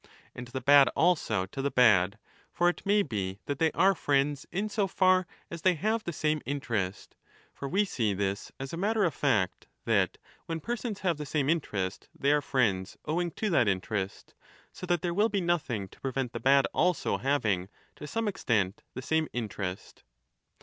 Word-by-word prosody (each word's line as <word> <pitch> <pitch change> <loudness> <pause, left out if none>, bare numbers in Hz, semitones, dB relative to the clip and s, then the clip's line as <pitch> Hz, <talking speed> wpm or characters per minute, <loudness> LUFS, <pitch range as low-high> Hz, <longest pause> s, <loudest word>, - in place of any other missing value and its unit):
And 120 - -8
the 130 +2 -5
bad 140 +2 +7
also 150 - +2
to 115 +8 -6
the 140 - 0
bad; 105 -6 +4 0.3
for 175 - +2
it 175 - -4
may 205 0 +4
be 100 - -3
that 140 -1 -3
they 160 -1 +3
are 190 +3 +4
friends 140 -3 0
in 195 +4 -1
so 205 -1 0
far 185 -1 +3 0.2
as 170 -1 -6
they 185 +1 +3
have 215 +7 -1
the 170 - -2
same 155 -1 0
interest. 110 -9 -3 0.4
For 140 - -6
we 200 +6 +2
see 110 - -1
this 100 +1 -2
as 135 +2 -6
a - - -3
matter 210 +4 +1
of 170 -5 +1
fact, 105 -10 0 0.2
that, - - +2 0.3
when 165 0 -3
persons 235 +1 -4
have 175 -5 +1
the 150 - -4
same 145 0 +1
interest, 100 - -3
they 140 - +2
are 150 0 +3
friends 110 -10 0
owing 175 +3 0
to 215 -3 -2
that 125 -9 +3
interest, 95 0 -2 0.4
so 180 - -8
that 175 -1 +1
there 175 -1 0
will 210 +5 +3
be 205 - 0
nothing 145 - -1
to - - -19
prevent 130 -2 -2
the - - -4
10 - - -18
bad 135 0 +5
also 180 -3 +1
having 105 -10 0 0.3
to 150 - -8
some 225 +9 -2
extent 110 - 0
the 130 - -5
same 160 +2 +1
interest. 100 -5 -5
140 Hz, 190 wpm, -29 LUFS, 110-175 Hz, 0.4 s, bad